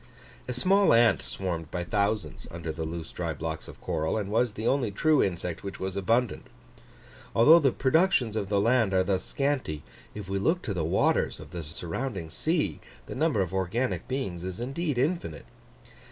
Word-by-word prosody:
A 125 - -2
small 195 +8 +4
ant 115 0 +5
swarmed 85 -5 -4
by 90 +1 -3
thousands 105 +2 -1
under 85 -1 -5
the 80 +1 -4
loose 80 0 -5
dry 85 -2 -3
blocks 80 +1 -5
of - - -11
coral, 80 +6 -1
and 100 -2 -3
was 115 0 +2
the 110 +2 -5
only 130 -3 +2
true 150 +9 +3
insect 90 -2 -2
which 100 -1 -6
was 95 0 -3
abundant. 115 +4 0 0.9
Although 155 +9 +8
the 140 -5 +3
productions 135 - +2
of 100 -3 -2
the 100 -1 +2
land 115 -2 +3
are 95 - +4
thus 95 0 0
scanty, 135 - -1 0.3
if 105 -3 -6
we 95 0 -1
look 170 - +1
to 105 - -2
the 85 -4 -1
waters 80 - +1
of 75 0 -11
the 85 -2 -5
surrounding 85 - -5
sea, 160 - 0 0.3
the - - -7
number 150 -7 +1
of 90 - -6
organic 95 +7 -1
beings 115 -10 -3
is 95 +1 -5
indeed 135 +4 -2
infinite. 135 - -1
100 Hz, 180 wpm, -28 LUFS, 90-130 Hz, 0.9 s, Although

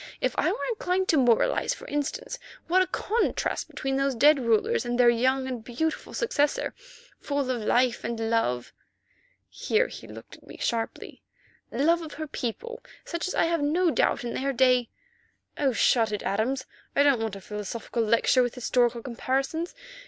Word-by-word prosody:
If - - 0
I - - +2
were 430 - -3
inclined 380 -4 0
to 315 - +4
moralize, 250 - +3
for - - -12
instance, 290 0 -3 0.3
what 365 +3 +3
a 370 - +1
contrast 460 +3 -1
between 270 0 -3
those 275 -1 +1
dead 290 +5 +5
rulers 255 - +2
and 240 0 -2
their 240 -1 +7
young 260 +3 +1
and 250 -4 -5
beautiful 285 +8 -3
successor, 310 -12 0 0.5
full 285 -1 -2
of 245 -3 -2
life 245 +2 +2
and 230 0 -3
love"—here 230 - -3
he - - -10
looked - - -11
at - - -22
me - - -11
sharply—"love 270 +6 -2
of 315 -2 -8
her 310 - -5
people, 310 - -5 0.2
such 340 +1 -3
as - - -3
I - - +3
have 335 -1 0
no 330 +4 +2
doubt - - +1
in 240 - -4
their 275 +1 -1
day——" 250 -2 +3 0.7
"Oh, 275 -2 +1
shut 225 -1 +3
it, 210 - -3
Adams! 245 +6 -1 0.3
I 285 - +5
don't 275 -5 +3
want 220 -3 -2
a - - -7
philosophical 210 +4 -4
lecture 230 +3 +3
with 245 0 -1
historical 240 -1 +1
comparisons. 270 - -2
260 Hz, 165 wpm, -27 LUFS, 235-320 Hz, 0.7 s, their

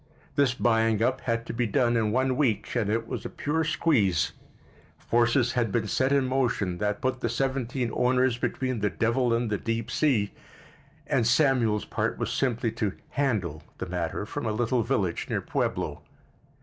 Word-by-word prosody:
This 135 -4 +3
buying 115 -2 +2
up 130 +2 +1
had 115 -1 -1
to - - -5
be 120 0 0
done 120 +3 +2
in 110 -2 +1
one 130 +2 +1
week, 115 -8 0
and 110 -4 +1
it 115 +1 0
was - - -4
a - - -5
pure 160 +3 -1
squeeze. 140 - +2 0.7
Forces 120 +1 +2
had 120 -4 0
been 110 +1 0
set 130 +6 +1
in 140 -2 +3
motion 125 -9 0
that 105 0 -1
put 130 -1 0
the 120 - -1
seventeen 130 -1 -1
owners 125 -1 +2
between 130 -1 -1
the 105 0 +1
devil 115 +7 +1
and 115 -1 0
the 105 - 0
deep 115 0 -2
sea, 115 -10 +1 0.7
and 115 - +1
Samuel's 120 -5 +3
part - - -2
was - - -2
simply 120 -3 0
to 105 -3 +1 0.2
"handle" 100 - -1 0.2
the - - -4
matter 90 +2 -3
from 120 +3 -4
a - - +1
little 120 +2 +1
village 95 -5 -1
near - - 0
Pueblo. - - -2
120 Hz, 175 wpm, -27 LUFS, 110-130 Hz, 0.7 s, This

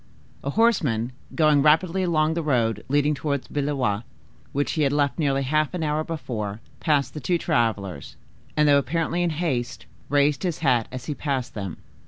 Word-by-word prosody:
A 140 - -2
horseman 145 - +2 0.2
going 155 -3 +4
rapidly 165 +5 +3
along 160 -3 +2
the 170 - -1
road 115 -8 +1
leading 145 +2 +3
towards 140 -2 -2
Blois, 135 -8 -1 0.5
which 145 +1 0
he 155 - -1
had 140 -2 +3
left 145 -2 +1
nearly 140 -3 +1
half 155 +5 +1
an 170 - -2
hour 150 0 0
before, 115 -11 -4 0.2
passed 145 -4 +1
the 150 - -5
two 175 +4 +1
travelers, 105 - -1 0.4
and, 150 0 +4
though 140 -1 +6
apparently 165 +5 -1
in 175 - +2
haste, 150 -7 -2 0.2
raised 145 0 +3
his 175 -4 -1
hat 120 -4 +3
as 130 -1 -6
he 150 - -2
passed 135 -4 -3
them. 95 -5 -5
145 Hz, 175 wpm, -24 LUFS, 125-155 Hz, 0.5 s, though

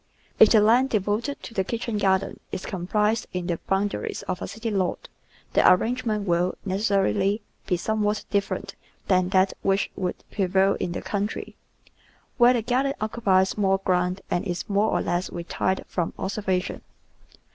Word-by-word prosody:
If 220 - +9
the 220 - +6
land 240 +5 +4
devoted 215 +6 -1
to 230 - -8
the 190 - +1
kitchen 230 +1 -3
garden 190 -1 +1
is - - -5
comprised 210 +4 0
in 180 -1 -3
the 170 -2 -2
boundaries 195 +1 -1
of 185 - -4
a - - -3
city 225 +2 -4
lot 190 -3 -1 0.5
the - - +4
ar 180 - +7
rangement 225 -2 -2
will, 175 +1 +1
necessarily, 200 +1 +1 0.2
be 180 - +1
somewhat 210 +2 -1
different 200 -1 -1 0.3
than 185 -1 +3
that 190 0 +3
which 195 +1 +1
would 180 -1 -3
prevail 195 0 +2
in 175 - -2
the - - -5
country, 205 +1 -3 0.8
where 240 +1 +7
the 235 -3 0
garden 260 +4 +1
occupies 210 -3 +1
more 195 -1 +3
ground 180 0 0
and 175 - +1
is 175 +3 -3
more 205 +1 +2
or - - 0
less 175 +1 -1
retired 175 +2 -2
from 175 -3 -2
observation. 190 -2 -2
200 Hz, 160 wpm, -25 LUFS, 185-215 Hz, 0.8 s, If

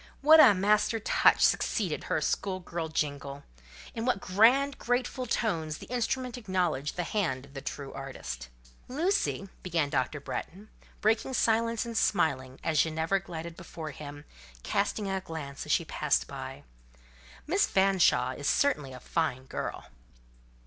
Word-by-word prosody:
What 310 +3 +8
a 255 -10 +9
master 210 +4 +2
touch - - +4
succeeded - - 0
her - - 0
school 190 -2 -1
girl 170 -2 -4
jingle! 145 -2 -3 0.5
In 225 - -4
what 250 -4 +1
grand, 245 +9 +3
grateful 250 +1 -1
tones 165 -10 -1
the - - -10
instrument 250 +1 -1
acknowledged 180 - -1
the 175 - -1
hand 165 -10 -1
of 140 - -18
the 135 - -6
true 135 0 -6
artist! 65 - -7 0.4
"Lucy," 305 - 0
began 165 -5 -1
Dr. 130 +4 0
Bretton, 195 +8 -6 0.3
breaking 225 +4 +1
silence 230 +1 +2
and 230 -1 -6
smiling, 135 -11 +1
as 160 -2 +1
Ginevra 160 +4 0
glided 170 -2 -7
before 160 -2 -7
him, 145 0 -9 0.4
casting 205 +1 -1
a 190 0 -1
glance 150 -6 -7
as - - -2
she - - +2
passed - - +1
by, - - -7 0.8
"Miss - - +2
Fanshawe 185 -10 +3
is 145 - -1
certainly 150 - +1
a 125 - -9
fine 130 -2 -1
girl." - - -5
175 Hz, 145 wpm, -29 LUFS, 145-225 Hz, 0.8 s, a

